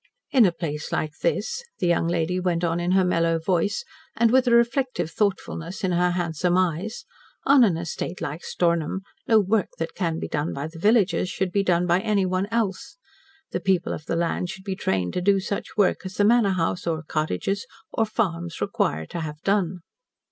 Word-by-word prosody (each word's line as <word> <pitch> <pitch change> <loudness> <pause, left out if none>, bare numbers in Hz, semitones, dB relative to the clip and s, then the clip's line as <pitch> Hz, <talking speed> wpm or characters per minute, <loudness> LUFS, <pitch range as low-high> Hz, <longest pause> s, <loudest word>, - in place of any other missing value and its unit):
"In 250 -8 +6
a - - +1
place 150 -3 -5
like 155 -1 -1
this," 465 - -1
the - - -1
young 170 -1 +2
lady 170 +1 0
went 180 -2 0
on 170 0 +1
in 175 +1 0
her 190 -1 +4
mellow 165 -2 +2
voice, 180 +4 0 0.3
and 230 0 +3
with 260 0 +4
a - - +4
reflective 235 - +2
thoughtfulness 190 -2 -2
in 185 - +1
her 180 +1 +2
handsome 175 0 0
eyes, 185 +5 -1 0.4
"on 275 -2 +7
an 190 -8 +3
estate 170 +2 -4
like 155 +4 -5
Stornham, 170 +1 0 0.3
no 220 -1 +6
work 205 0 +1
that 165 0 -3
can 165 -4 -1
be - - -4
done 150 +2 -2
by 140 +1 -3
the 160 +1 -9
villagers 200 -3 +3
should 190 -1 -2
be 200 - +2
done 180 -2 +2
by 175 +1 +3
anyone 195 -2 0
else. 230 - -2 0.5
The - - -1
people 185 -2 +1
of 150 - -7
the - - 0
land 170 +1 -1
should 190 +1 -8
be 195 -1 -3
trained 95 - -1
to 180 - -1
do 195 +1 +3
such 200 +3 -4
work 200 -3 +2
as 185 0 -7
the 205 - +3
manor 220 -3 +4
house, 175 0 -1
or 160 -1 -1
cottages, 155 - -2 0.2
or 225 - +1
farms 175 -6 -2
require 80 +1 0
to 170 - -6
have 150 -2 -5
done." 190 -3 +1
180 Hz, 200 wpm, -24 LUFS, 165-200 Hz, 0.5 s, on